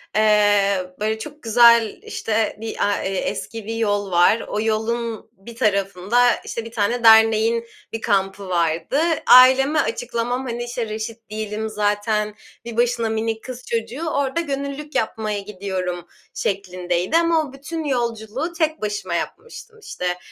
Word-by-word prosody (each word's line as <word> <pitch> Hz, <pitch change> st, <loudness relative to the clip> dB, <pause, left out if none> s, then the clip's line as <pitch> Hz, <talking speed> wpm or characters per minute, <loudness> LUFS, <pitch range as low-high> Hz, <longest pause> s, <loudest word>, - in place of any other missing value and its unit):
eee, 205 Hz, -3 st, +3 dB
böyle, 220 Hz, +1 st, -1 dB
çok 295 Hz, +3 st, -9 dB
güzel, 235 Hz, -1 st, +5 dB
işte, 220 Hz, -1 st, -2 dB
bir 225 Hz, -, -5 dB
a 205 Hz, -, +1 dB
e -, -, -1 dB
eski 225 Hz, +2 st, -4 dB
bir 225 Hz, +1 st, -4 dB
yol 205 Hz, -3 st, -1 dB
var. 175 Hz, +6 st, +4 dB
O 210 Hz, -, -3 dB
yolun 225 Hz, +1 st, -2 dB
bir 225 Hz, +3 st, -13 dB
tarafında, 205 Hz, +2 st, +2 dB
işte, 230 Hz, -1 st, -5 dB
bir 230 Hz, -, -9 dB
tane 230 Hz, +2 st, -1 dB
derneğin 225 Hz, +1 st, +5 dB, 0.3 s
bir 225 Hz, -, -4 dB
kampı 195 Hz, -1 st, 0 dB
vardı. 170 Hz, -, 0 dB, 0.3 s
Aileme 265 Hz, +4 st, +7 dB
açıklamam, 255 Hz, -, -2 dB
hani, 240 Hz, 0 st, -3 dB
işte, 240 Hz, -2 st, -4 dB
reşit 220 Hz, +1 st, -6 dB
değilim 215 Hz, 0 st, -4 dB
zaten, 210 Hz, 0 st, -1 dB, 0.3 s
bir 235 Hz, -1 st, -7 dB
başına 240 Hz, -1 st, +1 dB
minik 220 Hz, 0 st, -2 dB
kız 255 Hz, -1 st, -8 dB
çocuğu, 240 Hz, +8 st, -3 dB
orada 280 Hz, +2 st, -1 dB
gönüllülük 280 Hz, 0 st, -5 dB
yapmaya 215 Hz, -2 st, -1 dB
gidiyorum 185 Hz, -3 st, -5 dB, 0.3 s
şeklindeydi 185 Hz, -, -1 dB
ama 335 Hz, -1 st, +3 dB
o 270 Hz, -, -12 dB
bütün 310 Hz, +4 st, -6 dB
yolculuğu 240 Hz, +3 st, -2 dB
tek 315 Hz, -4 st, -1 dB
başıma 205 Hz, -4 st, -3 dB
yapmıştım. 450 Hz, -, -7 dB
İşte, 180 Hz, -, -4 dB
225 Hz, 140 wpm, -21 LUFS, 205-245 Hz, 0.3 s, Aileme